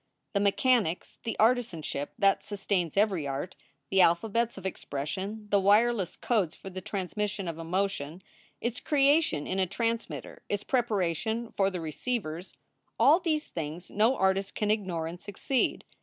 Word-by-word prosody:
The 200 - +2
me 200 0 +4
chanics, 225 -8 +1
the 225 - -2
artisanship 215 - +1
that 195 -1 +3
sustains 195 -4 -2
every 195 -8 +2
art, 140 +6 -4 0.4
the 190 - +5
alphabets 220 +7 +2
of 190 - -9
expression, 190 +6 -4
the 200 - +5
wireless 205 0 +3
codes 195 -8 0
for 195 - -9
the 185 +1 -6
transmission 200 +1 -3
of 165 -1 -4
emotion, 175 -1 -2 0.4
its 235 0 -2
creation 280 - +3
in 190 - -2
a 190 - +2
transmitter, 230 +4 -3
its 205 0 -1
preparation 220 - 0
fcr 195 0 +1
the 180 -2 -4
receivers 165 - -3 0.4
all 280 +9 +7
these 315 -4 0
things 165 +2 -6
no 225 +5 +3
artist 190 +1 +1
can 210 -1 +1
ignore 185 -6 -1
and 170 +2 -6
succeed. 210 +7 -1
195 Hz, 150 wpm, -29 LUFS, 175-225 Hz, 0.4 s, all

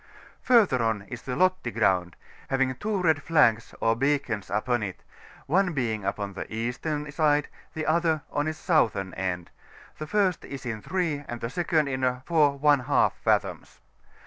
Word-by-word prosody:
FiuiSier 220 - +4
on 110 -3 0
is 115 +3 -8
the 125 - -5
£otti 185 -4 +1
Groundy 90 -2 +1 0.3
having 135 -1 +1
two 205 - -2
red 160 -4 +3
flags 120 -9 +2
or 115 0 +2
beacons 130 -6 -1
upon 120 +3 0
it^ 95 -3 -4 0.5
one 180 +3 +2
being 110 -7 -2
upon 100 0 -3
the 95 - -7
eastern 140 +7 -3
side, 150 -1 +2 0.3
the 155 -1 -3
other 160 -1 +1
on 145 +1 -1
its 155 -1 -3
southern 110 - +1
end: 90 -2 -3 0.5
the 155 - -5
first 195 -3 +1
is 140 -1 -8
in 110 -3 -4
3, 160 - -2
and 120 - -5
the 115 +1 -4
second 160 -2 +1
in 130 -1 -3
4^ 140 +1 +2
fathoms. - - -1
135 Hz, 155 wpm, -26 LUFS, 115-155 Hz, 0.5 s, FiuiSier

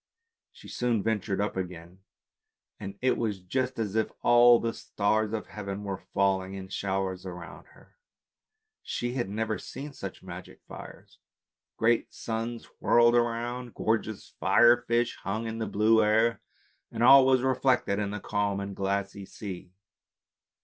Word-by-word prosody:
She - - -15
soon 120 -4 -1
ventured 105 -3 -1
up 105 +1 -1
again, 90 -1 -6 0.8
and 100 -1 -7
it 130 - +3
was 105 -4 -2
just 130 +8 -2
as 110 -3 -2
if 110 -1 +1
all 120 0 +7
the 115 0 -2
stars 105 +1 0
of 110 -1 -3
heaven 100 -1 -6
were 100 -2 -4
falling 95 -1 +1
in 95 -1 -8
showers 95 -2 -2
round 90 -2 -7
about 85 - -11
her. - - -22 0.8
She 120 0 -3
had 120 -6 -2
never 110 +1 -2
seen 145 +1 -8
such 100 -8 -8
magic 90 0 -10
fires. - - -12 0.6
Great 115 +1 +2
suns 115 +1 -4
whirled 120 0 +5
round, 120 +1 -1
gorgeous 110 -2 -2
fire 120 0 +6
fish 120 0 +1
hung 110 +4 -3
in 115 0 -4
the 110 - -2
blue 110 +2 +3
air, 110 +2 +2 0.5
and 115 +1 -2
all 135 +2 +9
was 130 -1 +3
reflected 130 -5 +1
in 105 -1 -1
the 105 +1 -4
calm 100 -1 -1
and 100 0 -5
glassy 100 0 -2
sea. 95 -3 -8
110 Hz, 150 wpm, -28 LUFS, 100-120 Hz, 0.8 s, all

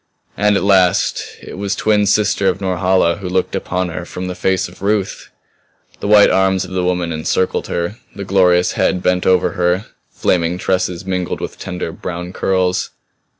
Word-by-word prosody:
And 105 0 +2
at - - -1
last 95 -3 +3 0.2
it - - -9
was 100 0 -1
twin 105 -1 +2
sister 100 -1 +2
of - - +1
Norhala 90 -2 +1
who 95 -3 -5
looked 95 0 -1
upon 90 0 -2
her 85 +1 -5
from 90 +1 -6
the 90 - -3
face 95 +1 0
of 90 +1 -16
Ruth! 100 -1 -1 0.7
The - - -4
white 105 0 +6
arms 95 0 +2
of - - -11
the 95 -1 -1
woman 90 -1 0
encircled 80 +3 -1
her; 85 +6 -3 0.2
the 100 - -6
glorious 90 -2 +3
head 90 -1 0
bent 90 0 +1
over 90 -1 +3
her; 90 +3 0 0.3
flaming 85 0 0
tresses 90 -1 -1
mingled 90 -2 -2
with - - -6
tender 90 -3 -4
brown 90 +1 -6
curls. 95 -1 0
90 Hz, 175 wpm, -17 LUFS, 90-95 Hz, 0.7 s, white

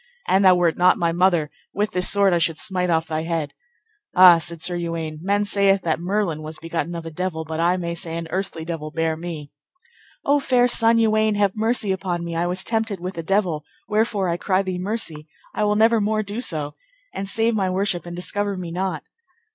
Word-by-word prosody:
An 190 - +3
thou 185 -2 +6
wert 175 -2 +1
not 180 +1 +5
my 170 -1 +1
mother, 175 -3 +2 0.2
with 210 +1 0
this 180 -3 +4
sword 200 -2 +4
I 170 - +2
should 165 -2 +1
smite 180 -2 0
off 160 -1 +1
thy 155 0 -2
head. 165 -3 -3 0.6
Ah, 180 -2 +8
said 170 0 -3
Sir 175 +2 -1
Uwaine, 165 -2 -4
men 200 +3 +1
saith 200 -1 +2
that 160 -1 0
Merlin 180 -3 -1
was 155 +1 -7
begotten 165 +1 -4
of 165 -1 -6
a 165 - -6
devil, 160 -1 -3
but 160 +1 -5
I 175 +2 +2
may 170 -1 -3
say 165 -1 -4
an 170 - -4
earthly 190 -4 -3
devil 160 -3 -5
bare 160 0 -1
me. 160 -3 -7 0.7
O 290 +1 +3
fair 250 -3 +3
son, 230 -1 +4
Uwaine, 215 -1 +2
have 200 -2 +1
mercy 220 -2 0
upon 185 -2 -2
me, 170 -1 -5
I 170 +1 0
was 185 +2 -2
tempted 220 -3 -1
with 185 +2 -5
a 165 - -4
devil, 175 -3 0 0.2
wherefore 210 -2 0
I 170 0 -1
cry 185 +1 +1
thee 185 -2 -4
mercy; 180 -6 -4 0.3
I 215 - -1
will 210 0 +2
never 225 +1 +4
more 215 +1 0
do 205 +4 -5
so; 150 - -2 0.4
and 195 0 -4
save 225 +3 +1
my 195 -4 0
worship 185 -2 -1
and 175 - -6
discover 200 +2 -2
me 175 -2 -6
not. 180 -2 -3
180 Hz, 215 wpm, -22 LUFS, 165-205 Hz, 0.7 s, Ah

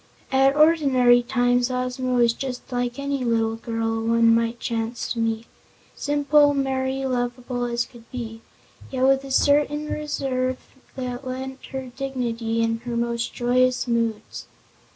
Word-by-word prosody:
At 270 +1 +4
ordinary 275 -6 +5
times 245 0 +1
Ozma 255 0 -1
was 235 -1 +4
just 255 0 -6
like 245 0 -2
any 280 -1 -2
little 225 -2 +1
girl 225 0 -2
one 230 0 +4
might 230 +1 0
chance 230 0 -3
to 235 - -5
meet 225 0 -1 0.5
simple, 290 0 +3
merry, 265 0 -1
lovable 245 -1 -2
as 235 0 -1
could 230 -2 -17
be 225 -3 -6 0.5
yet 260 -1 -2
with 270 0 +4
a 275 - -8
certain 295 +2 +2
reserve 260 -4 -2 0.4
that 250 0 -5
lent 260 +1 -6
her 265 -2 -6
dignity 235 -4 -2
in 225 0 0
her 235 0 -4
most 235 0 -2
joyous 250 +1 +2
moods. 230 -2 -2
250 Hz, 140 wpm, -23 LUFS, 235-265 Hz, 0.5 s, ordinary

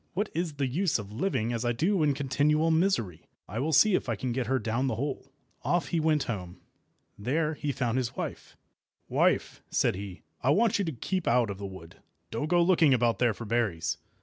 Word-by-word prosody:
What 205 +3 0
is 170 -2 -2
the 140 -1 -1
use 155 +6 +1
of 105 -2 -8
living 120 - -1
as 115 0 -2
I 120 0 +1
do 175 - +1
in 145 -2 +2
continual 150 +4 +2
misery? 160 - +1 0.3
I 110 - -4
will 150 +5 0
see 210 +7 +5
if 155 - 0
I 115 - +1
can 125 +4 -3
get 125 -1 -2
her 130 +1 +2
down 115 +3 -1
the 130 - -1
hole." 135 +2 -4 0.3
Off 170 -5 0
he 170 - +1
went 155 -2 +2
home. 90 -6 -5 0.6
There 150 +8 0
he 145 -1 -3
found 125 -1 0
his 120 -2 -3
wife. - - -6 0.5
"Wife," - - +1
said - - +2
he, 95 -1 -8 0.2
"I - - +1
want 215 +8 +3
you 200 - +1
to 165 - -2
keep 180 +8 -3
out 120 -3 +3
of 95 - -7
the 100 - -4
wood. 95 -4 -11 0.3
Don't 115 +7 -2
go 175 +1 +4
looking 165 -6 +5
about 120 -1 +1
there 120 -4 +2
for 115 - -7
berries." 100 -8 -1
130 Hz, 215 wpm, -28 LUFS, 115-160 Hz, 0.6 s, see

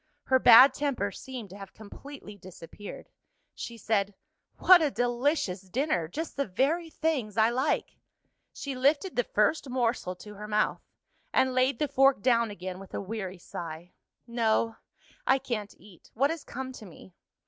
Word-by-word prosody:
Her 260 0 +3
bad 255 +3 +9
temper 265 -8 -1
seemed 245 -4 -8
to 195 - -10
have 195 -1 -11
completely 220 +1 -11
disappeared. 185 +1 -11 0.4
She 235 - -7
said, 205 -2 0 0.4
"What 370 -2 +7
a 305 - +2
delicious 245 - 0
dinner! 190 - -1
Just 315 - -5
the 280 -2 -1
very 300 - 0
things 285 -11 -2
I 220 +1 +4
like." 255 +3 -1 0.5
She 280 - -6
lifted 285 +8 +1
the 245 - +2
first 245 +8 +1
morsel 240 -7 -1
to 210 +3 -11
her 210 +1 -8
mouth 210 0 0 0.5
and 260 0 +2
laid 255 0 +2
the 300 - 0
fork 270 -5 +3
down 235 -3 +3
again 185 -2 -7
with 195 - -10
a - - -2
weary 195 -2 -5
sigh. 170 0 -8 0.3
"No: 230 -1 0 0.5
I 265 - +5
can't 215 -6 -5
eat; 190 -5 -18
what 275 +6 +2
has 325 -2 -5
come 260 +1 -6
to 240 -4 -11
me?" 180 +1 -15
235 Hz, 160 wpm, -28 LUFS, 200-270 Hz, 0.5 s, bad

